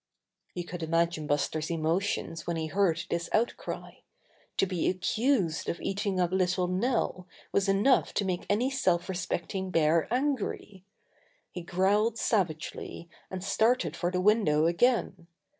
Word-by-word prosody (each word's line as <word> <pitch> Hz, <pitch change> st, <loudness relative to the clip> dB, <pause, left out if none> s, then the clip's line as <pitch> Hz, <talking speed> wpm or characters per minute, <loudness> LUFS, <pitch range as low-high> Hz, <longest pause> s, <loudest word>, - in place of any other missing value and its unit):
You 175 Hz, -, -3 dB
could 175 Hz, 0 st, -7 dB
imagine 165 Hz, -1 st, 0 dB
Buster's 155 Hz, +2 st, 0 dB
emotions 165 Hz, 0 st, -1 dB
when 170 Hz, -1 st, -1 dB
he 160 Hz, -, -2 dB
heard 170 Hz, 0 st, +1 dB
this 170 Hz, 0 st, -1 dB
outcry. 230 Hz, +2 st, -2 dB, 0.6 s
To -, -, +4 dB
be 180 Hz, -3 st, 0 dB
accused 190 Hz, -, 0 dB
of 170 Hz, -, -3 dB
eat 200 Hz, +2 st, -2 dB
ing 190 Hz, -2 st, 0 dB
up 175 Hz, -1 st, +1 dB
little 185 Hz, -1 st, +1 dB
Nell 185 Hz, -1 st, -1 dB, 0.2 s
was 195 Hz, -1 st, +1 dB
enough 205 Hz, +7 st, +3 dB
to 205 Hz, -, +1 dB
make 180 Hz, -2 st, -2 dB
any 240 Hz, +6 st, +2 dB
self 185 Hz, -11 st, +1 dB
respecting 190 Hz, 0 st, -3 dB
bear 165 Hz, +1 st, +2 dB
angry. 245 Hz, -7 st, -2 dB, 0.7 s
He 180 Hz, -, -6 dB
growled 200 Hz, +6 st, +1 dB
sav 205 Hz, -7 st, +2 dB
agely, 160 Hz, +1 st, -8 dB, 0.2 s
and 185 Hz, -1 st, -5 dB
started 205 Hz, -, +1 dB
for 175 Hz, -, -1 dB
the 180 Hz, 0 st, -1 dB
window 190 Hz, -7 st, +3 dB
again. 185 Hz, -1 st, +1 dB
185 Hz, 145 wpm, -29 LUFS, 170-205 Hz, 0.7 s, To